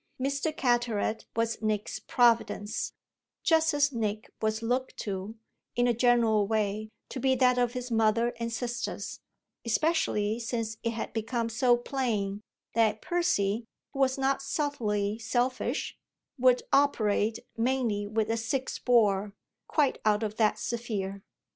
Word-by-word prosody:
Mr. 280 Hz, +4 st, 0 dB
Carteret 240 Hz, -6 st, 0 dB
was 230 Hz, 0 st, 0 dB
Nick's 215 Hz, -1 st, -1 dB
providence, 230 Hz, -3 st, +1 dB, 0.5 s
just 320 Hz, -1 st, +4 dB
as 290 Hz, -1 st, +2 dB
Nick 215 Hz, -2 st, -2 dB
was 220 Hz, +1 st, 0 dB
looked 250 Hz, +3 st, -1 dB
to, 200 Hz, +1 st, -4 dB, 0.4 s
in 245 Hz, 0 st, +3 dB
a 240 Hz, -, +3 dB
general 230 Hz, -3 st, +3 dB
way, 215 Hz, 0 st, -1 dB, 0.2 s
to 265 Hz, -, -5 dB
be 265 Hz, 0 st, +3 dB
that 250 Hz, -1 st, +4 dB
of 245 Hz, -1 st, +1 dB
his 250 Hz, -1 st, -5 dB
mother 225 Hz, +1 st, +2 dB
and 230 Hz, 0 st, -2 dB
sisters, 240 Hz, 0 st, -4 dB, 0.4 s
especially 230 Hz, -5 st, +1 dB
since 230 Hz, -1 st, -3 dB
it 230 Hz, -, -1 dB
had 225 Hz, -, -5 dB
become 230 Hz, +1 st, -1 dB
so 240 Hz, +1 st, +3 dB
plain 220 Hz, -6 st, -2 dB, 0.3 s
that 220 Hz, -1 st, +2 dB
Percy, 230 Hz, -, +1 dB, 0.3 s
who 275 Hz, -, -6 dB
was 265 Hz, -1 st, +3 dB
not 270 Hz, 0 st, +1 dB
subtly 225 Hz, -8 st, -1 dB
selfish, 245 Hz, +2 st, -1 dB, 0.4 s
would 250 Hz, 0 st, +4 dB
operate, 220 Hz, -6 st, +3 dB, 0.2 s
mainly 230 Hz, -4 st, 0 dB
with 220 Hz, +1 st, 0 dB
a 230 Hz, -, 0 dB
"six 255 Hz, +4 st, -2 dB
bore," 210 Hz, -4 st, +2 dB, 0.3 s
quite 290 Hz, -4 st, +1 dB
out 215 Hz, 0 st, +2 dB
of 215 Hz, 0 st, -3 dB
that 215 Hz, -2 st, +3 dB
sphere. 205 Hz, -5 st, -3 dB
230 Hz, 135 wpm, -29 LUFS, 215-255 Hz, 0.5 s, just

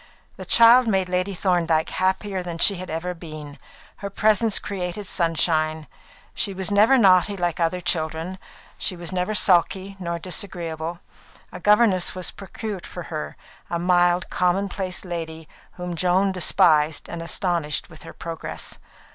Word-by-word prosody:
The -, -, -9 dB
child 235 Hz, +2 st, +6 dB
made 190 Hz, -4 st, +1 dB
Lady 185 Hz, +2 st, -1 dB
Thorndyke 170 Hz, -3 st, +1 dB
happier 190 Hz, +1 st, -1 dB
than 175 Hz, -2 st, -6 dB
she 195 Hz, +3 st, +4 dB
had 185 Hz, +1 st, -7 dB
ever 165 Hz, +3 st, -3 dB
been. 155 Hz, -4 st, -10 dB, 0.4 s
Her 200 Hz, -, -6 dB
presence 215 Hz, +1 st, +2 dB
created 190 Hz, 0 st, -4 dB
sunshine. 160 Hz, -3 st, 0 dB, 0.5 s
She 195 Hz, -, -2 dB
was 190 Hz, +2 st, -2 dB
never 215 Hz, +6 st, +5 dB
naughty 195 Hz, -2 st, +4 dB
like 175 Hz, -2 st, -1 dB
other 170 Hz, +2 st, 0 dB
children; 165 Hz, +1 st, -2 dB, 0.4 s
she 185 Hz, -, 0 dB
was 175 Hz, +1 st, -5 dB
never 185 Hz, +3 st, -1 dB
sulky 190 Hz, +1 st, +2 dB
nor 170 Hz, -2 st, -3 dB
disagreeable. 170 Hz, -2 st, -4 dB, 0.5 s
A -, -, -8 dB
governess 210 Hz, -4 st, +3 dB
was 185 Hz, -1 st, -3 dB
procured 200 Hz, -1 st, -7 dB
for 175 Hz, -, -8 dB
her, 155 Hz, -, -5 dB, 0.3 s
a 170 Hz, -, -1 dB
mild, 175 Hz, 0 st, +2 dB
common 180 Hz, +2 st, +1 dB
place 190 Hz, -2 st, -3 dB
lady 160 Hz, -2 st, -6 dB, 0.3 s
whom 180 Hz, -1 st, -6 dB
Joan 185 Hz, +3 st, +2 dB
despised 160 Hz, -4 st, +2 dB
and 170 Hz, -, -6 dB
astonished 170 Hz, -2 st, -1 dB
with 155 Hz, -, -12 dB
her -, -, -10 dB
progress. 165 Hz, -1 st, -5 dB
180 Hz, 145 wpm, -23 LUFS, 165-195 Hz, 0.5 s, child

